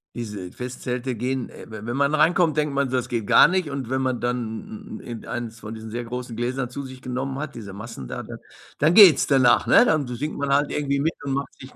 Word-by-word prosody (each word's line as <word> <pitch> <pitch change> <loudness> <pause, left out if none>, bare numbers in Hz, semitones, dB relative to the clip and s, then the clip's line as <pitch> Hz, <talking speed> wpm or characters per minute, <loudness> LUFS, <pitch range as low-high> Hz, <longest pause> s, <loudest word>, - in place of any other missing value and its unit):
Diese 105 -6 -6
Festzelte 125 0 -4
gehen 125 +2 -2
we - - -12 0.2
wenn 120 +3 -2
man 140 +1 +2
reinkommt, 160 +1 +3
denkt 150 -2 0
man 140 0 +2
so, 130 - +1
das 125 0 -3
geht 115 -4 -2
gar - - +7
nicht 180 -4 -1
und 135 -4 -4
wenn 130 0 0
man 130 -2 -1
dann 125 - -4
irgendeins 115 0 -6
von 110 0 -8
diesen 110 0 -8
sehr 120 +2 -4
großen 125 0 -6
Gläsern 125 +2 -2
zu 140 +3 -6
sich 130 -1 -10
genommen 130 +2 -4
hat, 150 -1 -6
diese 100 -4 -8
Maßen 100 - -8
da, - - -5
dann - - -9 0.4
dann 155 +3 +3
geht's 185 -8 +8
danach, 130 -4 +4
ne? - - +6
Dann 155 - +2
si 125 - -5
singt 150 +5 -4
man 145 -1 -2
halt 145 +1 +2
irgendwie 140 -1 -1
mit 160 +4 0
und 140 -1 -2
macht 140 0 -3
sich 130 - -12
130 Hz, 235 wpm, -24 LUFS, 120-140 Hz, 0.4 s, geht's